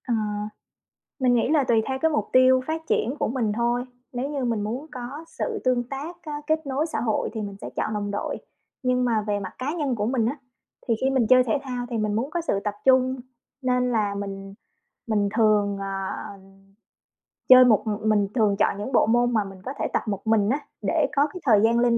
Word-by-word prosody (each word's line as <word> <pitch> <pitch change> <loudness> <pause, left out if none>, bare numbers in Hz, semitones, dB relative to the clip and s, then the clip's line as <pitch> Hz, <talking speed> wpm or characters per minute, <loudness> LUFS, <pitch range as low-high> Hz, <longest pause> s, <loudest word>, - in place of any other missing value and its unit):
Ờ, 245 - +1 1.1
mình 250 -1 +3
nghĩ 235 - +2
là 300 -3 +3
tùy 230 -3 +3
theo 265 -1 -2
cái 320 - +4
mục 300 - 0
tiêu 255 0 +6
phát 320 +1 -2
triển 245 +5 +1
của - - 0
mình 230 -3 -1
thôi, 240 +1 0 0.3
nếu 255 +3 -3
như 280 -3 -2
mình 230 -3 0
muốn 240 +8 -4
có 255 +5 -7
sự 450 -3 -2
tương 245 -1 +1
tác 290 +6 -6
á 300 -3 -5
kết 315 0 0
nối 275 +3 0
xã - - -1
hội 220 -3 -1
thì 220 - -4
mình 200 -1 -6
sẽ - - -7
chọn 215 - -1
đồng 205 -1 -2
đội. 205 - -3 0.5
Nhưng 250 -1 +1
mà 225 -3 +1
về 205 -1 0
mặt 190 - -6
cá 265 +3 -2
nhân 280 -5 0
của 210 -2 -1
mình 235 -2 +1
á, 260 +6 -1 0.5
thì 230 - +3
khi 265 - +2
mình 260 -4 +2
chơi 255 0 +6
thể 245 +3 +1
thao 250 -3 -4
thì 235 - -2
mình 215 -1 0
muốn 240 +7 -1
có 345 - -1
sự 265 -12 -1
tập 210 -1 -1
trung 260 0 +4 0.5
nên 250 -1 +1
là 210 -3 0
mình 195 -1 -6 0.5
mình 210 -3 +1
thường, 210 -3 +3
ờ, 195 - -4 1.6
chơi 255 0 +10
một, 220 -4 +4
ừm, 215 0 -1
mình 205 -2 +3
thường 215 -4 +3
chọn - - +2
những 210 +6 -5
bộ 245 - +4
môn 240 +2 +2
mà 215 -2 +2
mình 195 -1 -10
có 260 - -4
thể - - 0
tập - - +1
một 200 +1 -4
mình 215 -2 +3
á 275 +5 +1 0.3
để - - +2
có 285 +1 +4
cái 365 - -6
thời 215 -6 +5
gian 230 +1 +4
linh 235 -1 +3
240 Hz, 230 wpm, -24 LUFS, 215-265 Hz, 1.6 s, chơi